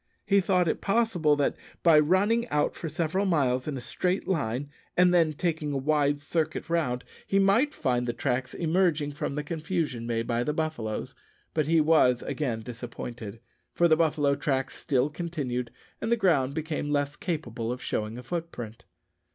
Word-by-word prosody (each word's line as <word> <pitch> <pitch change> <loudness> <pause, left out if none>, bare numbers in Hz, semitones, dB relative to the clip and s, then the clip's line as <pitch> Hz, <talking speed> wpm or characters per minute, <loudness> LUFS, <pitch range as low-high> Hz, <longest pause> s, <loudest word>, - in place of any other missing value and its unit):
He 200 0 +4
thought 180 -2 +2
it - - -1
possible 195 -8 +2
that, 145 -1 +1 0.3
by 165 -3 +7
running 205 +9 +2
out 150 0 +1
for 165 - -5
several 165 +5 0
miles 130 -7 +1
in 145 -3 -2
a - - -5
straight 180 +9 -1
line, 145 -5 -1 0.3
and 180 0 +5
then 165 -3 +4
taking 155 -1 -2
a - - 0
wide 145 +1 +2
circuit 160 +2 -2
round, 125 -8 0 0.2
he 195 - +2
might 200 +9 +4
find 125 - 0
the - - +1
tracks 125 +2 -2
emerging 165 -3 +1
from 145 -1 -4
the 150 - -2
confusion 155 -6 -2
made 115 -1 -1
by 120 0 0
the 150 - -1
buffaloes. 155 -10 -3 0.4
But 155 -2 +1
he 165 0 +4
was 150 -6 +4
again 120 -7 -2
disappointed, 115 -2 -7 0.3
for 170 - +5
the 160 - +5
buffalo 150 -3 +2
tracks 140 -2 -1
still 135 -1 +1
continued, 145 -7 -3 0.3
and 225 - -2
the 235 - +4
ground 145 - +2
became 155 -2 -2
less 145 0 0
capable 120 -11 -3
of 125 - -4
showing 110 -2 -3
a 125 - -8
footprint. 135 -7 -6
150 Hz, 175 wpm, -28 LUFS, 125-170 Hz, 0.4 s, by